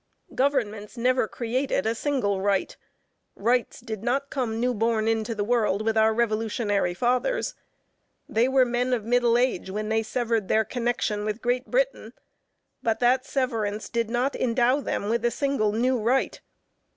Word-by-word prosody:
Governments 240 -5 -1
never 250 -1 +2
created 245 -1 -1
a 225 - +1
single 225 -7 -1
right; 200 -1 0 0.6
rights 240 +3 0
did 220 -4 -6
not 270 +4 -1
come 230 -4 -2
new 250 +1 +1
born 225 0 0
into 225 0 0
the 205 - -1
world 215 -3 +1
with 225 0 +1
our 220 0 +4
revolutionary 215 -4 0
fathers. 250 - 0 0.7
They 230 +3 +2
were 265 -1 +4
men 245 +1 0
of 225 -4 -1
middle 240 0 +3
age 245 -7 0
when 215 +2 -3
they 220 0 +2
severed 225 -2 -1
their 220 +2 +2
connexion 230 -3 -1
with 215 +1 -2
Great 245 +1 -1
Britain, - - -1 0.7
but 225 -1 0
that 255 +2 +2
severance 220 -6 -2
did 230 -1 -1
not 250 +4 0
endow 250 +3 +2
them 205 - -2
with 230 +1 0
a 240 - +3
single 275 -5 0
new 245 +3 +1
right. 245 +5 0
235 Hz, 160 wpm, -25 LUFS, 215-250 Hz, 0.7 s, our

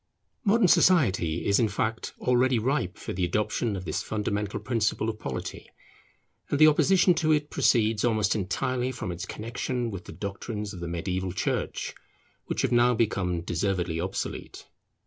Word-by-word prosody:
Modern 215 -1 +4
society 125 - +3
is, 100 -1 +3
in 115 - +3
fact, 110 +2 -2
already 125 0 +3
ripe 120 -5 -1
for - - -6
the 90 - -2
adoption 105 +4 0
of 95 -1 -6
this 80 - -2
fundamental 105 -1 -2
principle 115 -2 0
of 110 - -14
polity; 65 - -6 0.8
and 145 - +1
the 155 - +7
opposition 180 +4 +5
to 155 -2 +1
it 150 0 -1
proceeds 110 -3 +2
almost 110 -4 +2
entirely 125 +6 -1
from 115 -7 -5
its 90 +2 -6
connexion 120 +1 -3
with 95 -3 -7
the - - -9
doctrines 105 +4 -5
of 90 - -8
the 85 - -5
mediaeval 90 +2 -3
church 95 - -2 0.5
which - - -1
have - - +1
now 120 0 +4
become 95 -6 0
deservedly 85 -1 -1
obsolete. 95 +2 -5
105 Hz, 160 wpm, -27 LUFS, 95-125 Hz, 0.8 s, the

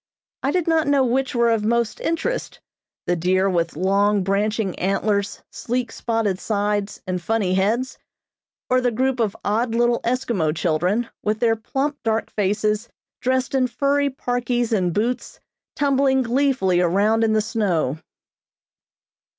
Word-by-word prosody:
I 270 - 0
did 345 +2 0
not 325 -2 +2
know 280 -2 +3
which 260 +2 0
were 235 -1 +3
of 225 -2 +1
most 235 +1 0
interest, 335 +10 -2 0.5
the 175 - +1
deer 185 +3 +2
with 170 -4 0
long, 200 +3 +2
branching 200 +1 0
antlers, 200 +1 -1
sleek 245 -1 -3
spotted 225 -6 -1
sides 205 -1 -2
and 180 -1 -3
funny 205 -2 0
heads, 220 +7 0 0.7
or 255 0 +2
the 250 - +2
group 260 +2 0
of 215 -4 0
odd 225 +3 0
little 240 0 +2
Eskimo 235 -11 -1
children, 180 +9 0
with 215 +1 -1
their 225 -1 +3
plump 275 +6 -3
dark 225 0 -1
faces, 210 +2 0 0.3
dressed 260 +1 0
in 260 -2 +2
furry 280 +3 +1
parkies 245 -2 -1
and 185 -4 +1
boots, 235 +7 -2 0.4
tumbling 275 -2 +2
gleefully 240 -8 +2
around 205 +6 +2
in 220 -1 +2
the 215 - +3
snow. 180 - -1
225 Hz, 140 wpm, -22 LUFS, 200-255 Hz, 0.7 s, know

